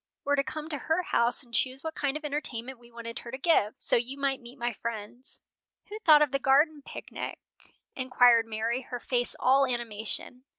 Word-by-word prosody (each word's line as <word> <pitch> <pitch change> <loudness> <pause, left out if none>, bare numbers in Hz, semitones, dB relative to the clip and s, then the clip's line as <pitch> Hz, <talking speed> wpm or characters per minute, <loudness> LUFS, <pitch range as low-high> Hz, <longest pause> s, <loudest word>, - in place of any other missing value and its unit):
were 285 - +2
to 275 - +1
come 310 +2 -6
to 300 -3 -4
her 320 +7 0
house 235 -4 +2
and 240 -2 -17
choose 260 +4 0
what 320 0 -4
kind 285 -1 -1
of 305 - -9
entertainment 265 -4 0
we 240 0 -18
wanted 230 -1 -7
her 235 - -10
to 260 - -5
give, 265 -8 +2
so - - +2
you 245 +3 -1
might 275 -1 -1
meet 240 +3 -12
my 240 -1 -2
friends." 230 +3 -7 0.5
"Who 425 +1 -6
thought 305 -7 +7
of 295 - -1
the 275 - 0
garden 290 +3 +3
picnic?" - - -7 0.6
inquired 245 -3 +4
Mary, 225 +3 -2
her 245 -1 -7
face 245 0 0
all 270 +2 +4
animation. 240 +1 -4
255 Hz, 200 wpm, -28 LUFS, 235-285 Hz, 0.6 s, thought